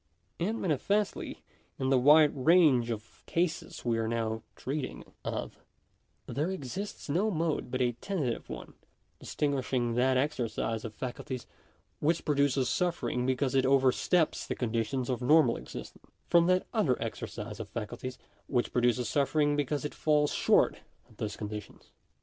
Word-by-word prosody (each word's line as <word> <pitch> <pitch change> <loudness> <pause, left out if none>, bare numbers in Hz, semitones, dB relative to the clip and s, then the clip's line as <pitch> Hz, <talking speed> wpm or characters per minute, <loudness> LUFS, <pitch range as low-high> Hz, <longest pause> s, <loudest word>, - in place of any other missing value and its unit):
And 215 +7 -1
manifestly, 200 +5 -1 0.3
in 130 0 0
the 130 - +5
wide 150 +3 +7
range 140 -4 +4
of 115 -1 -6
cases 165 -5 -2
we 115 -1 +1
are 110 - 0
now 110 -1 -1
treating 135 0 -4 0.2
of, - - -4 0.7
there 145 +8 -2
exists 190 +3 -5
no 180 +9 +1
mode 160 - -1
but 130 +1 0
a 120 - +2
tentative 135 - -3
one - - -7
of - - -19 0.5
dis - - -9
tinguishing 130 -4 0
that 130 +2 +3
exercise 120 -5 -1
of 110 -2 -7
faculties 125 -1 -5 0.5
which 165 +2 +1
produces 140 -3 +2
suffering 130 -4 0
because 130 0 +1
it 135 -1 +4
oversteps 135 +5 +2
the - - -2
conditions 120 +2 -1
of 125 -2 -2
normal 135 -1 +5
existence, - - -9 0.2
from 170 0 +5
that 185 0 +3
other 185 - +2
exercise 115 -1 -5
of - - -6
faculties 120 +3 -5 0.3
which 125 -3 0
produces 125 0 +2
suffering 145 +1 +2
be 145 - +2
cause 145 +2 -2
it 150 - -4
falls 150 -1 +2
short - - +3 0.3
of 110 - -21
those 105 -2 -4
conditions. 105 -1 -7
130 Hz, 150 wpm, -30 LUFS, 120-155 Hz, 0.7 s, wide